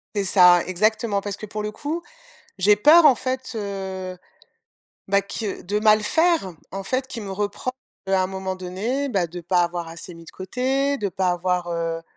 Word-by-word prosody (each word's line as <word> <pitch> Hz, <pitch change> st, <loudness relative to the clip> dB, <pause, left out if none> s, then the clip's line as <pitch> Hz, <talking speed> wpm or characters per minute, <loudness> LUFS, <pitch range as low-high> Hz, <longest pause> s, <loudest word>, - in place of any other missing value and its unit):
C'est 200 Hz, -, +1 dB
ça, 180 Hz, -2 st, +6 dB
exactement 215 Hz, +3 st, +1 dB
parce 200 Hz, -1 st, -4 dB
que 215 Hz, -, -8 dB
pour 215 Hz, 0 st, -5 dB
le 210 Hz, -, -3 dB
coup, 305 Hz, +8 st, -4 dB, 0.6 s
j'ai 205 Hz, +2 st, +5 dB
peur 305 Hz, +9 st, +7 dB
en 270 Hz, -, +7 dB
fait, 260 Hz, +1 st, -4 dB
heu, 190 Hz, -3 st, -5 dB, 0.9 s
bah, 200 Hz, 0 st, +3 dB
que 200 Hz, +1 st, -5 dB
de 205 Hz, +3 st, -1 dB
mal 215 Hz, 0 st, +4 dB
faire, 320 Hz, -, +2 dB, 0.2 s
en 195 Hz, +1 st, -5 dB
fait 255 Hz, +6 st, -2 dB
qu'il 235 Hz, -4 st, -7 dB
me 195 Hz, -, -6 dB
repro 205 Hz, +5 st, -2 dB, 0.4 s
heu, 195 Hz, -, 0 dB
à 190 Hz, -, +3 dB
un -, -, 0 dB
moment 190 Hz, 0 st, -4 dB
donné, 210 Hz, +10 st, -3 dB
bah, 195 Hz, -8 st, 0 dB
de 175 Hz, +2 st, -8 dB
pas 175 Hz, +1 st, +2 dB
avoir 170 Hz, -1 st, -3 dB
assez 170 Hz, +2 st, -9 dB
mis 165 Hz, 0 st, -13 dB
de -, -, -10 dB
côté, 265 Hz, +8 st, -1 dB
de 205 Hz, -, -1 dB
pas 185 Hz, 0 st, 0 dB
avoir, 180 Hz, 0 st, -1 dB
heu 165 Hz, -1 st, -2 dB
195 Hz, 195 wpm, -23 LUFS, 180-225 Hz, 0.9 s, peur